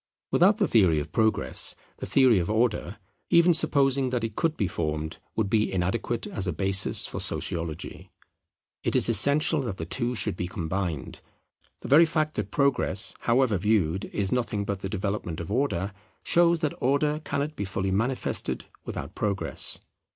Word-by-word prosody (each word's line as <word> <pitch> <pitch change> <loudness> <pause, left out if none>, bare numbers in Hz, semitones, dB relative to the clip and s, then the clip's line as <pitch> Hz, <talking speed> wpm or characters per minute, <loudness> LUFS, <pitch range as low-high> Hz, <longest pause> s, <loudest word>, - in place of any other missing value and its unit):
Without 200 +4 +4
the 200 -4 +1
theory 90 -9 +3
of 75 +1 -6
Progress, 110 -1 +1 0.2
the - - -6
theory 130 -7 +4
of 85 - -3
Order, 110 -3 0 0.3
even 170 +1 +5
supposing 140 -4 +2
that 125 -2 -2
it 110 -2 -4
could 165 -2 -1
be 100 - 0
formed, 80 -1 -4 0.2
would 110 -3 0
be 105 +1 +1
inadequate 95 +6 -2
as 95 -2 -1
a - - 0
basis 95 +3 +3
for - - -5
Sociology. 85 -2 -3 0.7
It - - -1
is - - +5
essential 150 +2 +4
that 115 -8 -5
the 80 - -5
two 120 +7 0
should 100 -5 +1
be 90 - -4
combined. 85 -4 -4 0.6
The - - -7
very 155 +5 +6
fact 155 -1 -1
that 100 -2 -2
Progress, 135 -7 +2
however 120 -4 +1
viewed, 95 -3 +1
is 100 -2 -2
nothing 115 -5 -1
but 100 -1 -3
the 95 - -5
development 100 -4 -3
of 85 +3 -6
Order, 105 -6 -1 0.3
shows 170 -1 +3
that 155 -3 -1
Order 150 +4 +1
cannot 150 +1 -3
be - - -4
fully 95 0 -2
manifested 120 +7 -1 0.2
without - - -6
Progress. 95 -9 -2
110 Hz, 165 wpm, -26 LUFS, 95-140 Hz, 0.7 s, very